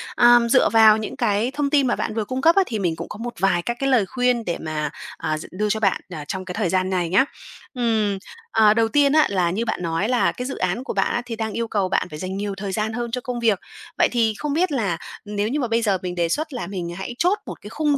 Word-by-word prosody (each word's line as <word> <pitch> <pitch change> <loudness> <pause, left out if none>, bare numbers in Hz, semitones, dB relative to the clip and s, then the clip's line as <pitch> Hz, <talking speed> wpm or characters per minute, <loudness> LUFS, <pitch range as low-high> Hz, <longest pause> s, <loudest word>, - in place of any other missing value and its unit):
Ờm, 240 -1 +6
dựa 255 +1 +5
vào 220 -1 +7
những 220 - -5
cái 230 -2 +1
thông 285 0 -1
tin 280 -2 +3
mà 240 - +1
bạn - - -3
vừa 220 -2 -1
cung 255 +5 -3
cấp 330 +4 +5
á, 390 - +5
thì 225 -8 -3
mình 175 -4 0
cũng 170 +1 -7
có - - -7
một 240 +2 -5
vài 185 -2 +2
các 240 +6 -3
cái 275 - 0
lời 245 -6 +4
khuyên 245 +2 0
để 170 - -2
mà, 155 -1 -2 0.3
à, 155 -1 -2
d 155 - -8
đưa 210 +3 -1
cho 220 - 0
bạn, 195 -3 +1
à, 155 -5 -7
trong 190 0 -4
cái 180 - -5
thời 180 - 0
gian 185 +1 +1
này 180 -3 0
nhá. 230 +10 +4 0.5
Ừm, 220 -5 0 0.3
ờ, 215 -2 +5
đầu 225 0 +2
tiên 280 +4 +3
á 310 -1 +6
là 180 -3 +1
như 220 +6 -1
bạn - - -2
nói 170 +6 -1
là 250 -1 +2
cái 250 - -6
dự 270 - -5
án 185 +7 -1
của - - -4
bạn 195 -1 +1
á, 240 - 0
thì 235 -2 -5
đang 220 -1 -3
yêu 230 0 -2
cầu 200 -4 0
bạn 195 - 0
phải 150 - -8
dành 185 +2 -4
nhiều 200 0 -3
thời 195 0 -4
gian 215 +2 -1
hơn 240 0 -3
cho 250 +1 -2
công 245 -1 -4
việc, 220 -5 +2 0.4
vậy - - +5
thì 230 -3 +2
không 295 -2 -2
biết 345 +2 +1
là 205 - 0 0.3
nếu 205 0 -2
như 275 +6 -1
mà 250 - 0
bây 230 +1 +1
giờ 205 -4 +2
mình 180 -1 -4
đề 170 -1 0
xuất 310 - -2
là 240 -9 -4
mình 180 -3 -4
hãy 190 +5 -6
chốt 370 +4 +2
một - - -8
cái 210 - -9
khung 295 +3 +1
220 Hz, 290 wpm, -22 LUFS, 190-245 Hz, 0.5 s, vào